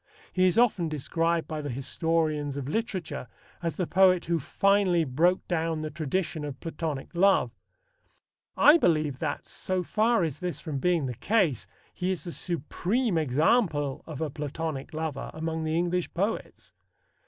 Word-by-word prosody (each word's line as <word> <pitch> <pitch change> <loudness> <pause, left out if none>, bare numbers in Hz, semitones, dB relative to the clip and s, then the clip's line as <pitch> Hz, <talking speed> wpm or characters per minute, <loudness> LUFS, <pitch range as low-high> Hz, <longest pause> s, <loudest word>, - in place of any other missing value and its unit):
He 185 0 +4
is 180 - +1
often 210 -9 +3
described 165 +3 0
by 155 -1 -4
the 145 - -4
historians 150 +2 -1
of 135 -2 -4
literature 185 - -3 0.3
as 165 -4 -2
the 180 - -1
poet 185 0 +4
who 170 -1 +1
finally 195 +2 +2
broke 160 +7 +1
down 165 -2 -1
the 155 - -4
tradition 160 0 -2
of 145 -3 -6
Platonic 160 -3 -4
love. 180 -8 +4 1.1
I 305 +4 +7
believe 155 - +1
that, 145 -3 -3
so 185 -1 -2
far 220 +2 +2
is 155 -5 -2
this 180 -5 -3
from 150 -5 -4
being 170 -2 +2
the 125 - -3
case, 140 - +1 0.3
he 185 0 -2
is 185 -2 -2
the 175 - -5
supreme 180 - -1
example 150 - +1
of 155 -2 -6
a 155 -3 -1
Platonic 150 0 -4
lover 155 -3 -4
among 160 0 -3
the 155 0 0
English 175 +1 0
poets. 200 +6 -3
165 Hz, 155 wpm, -28 LUFS, 150-180 Hz, 1.1 s, I